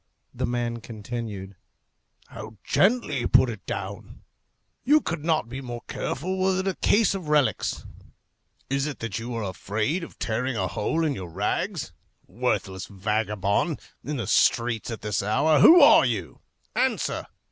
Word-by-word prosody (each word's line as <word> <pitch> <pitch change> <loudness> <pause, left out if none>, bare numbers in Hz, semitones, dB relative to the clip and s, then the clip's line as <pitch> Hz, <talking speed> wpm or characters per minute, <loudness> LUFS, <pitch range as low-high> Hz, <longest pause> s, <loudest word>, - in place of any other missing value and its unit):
The - - -2
man 120 -1 -2
continued, 105 -3 -6 0.7
"How 110 0 -10
gently 195 - +2
you 120 - -1
put 130 - +4
it 110 - -9
down! - - -6 0.6
You 300 +3 +5
could 165 - -4
not 160 -7 +1
be 130 +3 -6
more 120 -2 -7
careful 185 +8 -3
were 190 0 +2
it 190 - -4
a 190 - +1
case 210 -2 +3
of 185 -5 -5
relics. 150 -3 +1 0.8
Is 135 +2 0
it 145 - -5
that 115 -2 -4
you 120 +1 -5
are 115 - -2
afraid 105 - -2
of - - -10
tearing 120 +2 -2
a 95 - 0
hole 160 - -1
in 150 - +1
your 95 -8 -7
rags? 105 - -2 0.3
Worthless 95 -1 -2
vagabond! 105 - -1 0.2
in 150 0 -3
the 120 - -3
streets 115 -2 +2
at 115 - -6
this 105 -1 -1
hour! 140 +9 +3
Who 340 - +9
are - - +8
you? - - -3 0.3
Answer! - - 0
120 Hz, 160 wpm, -25 LUFS, 105-155 Hz, 0.8 s, Who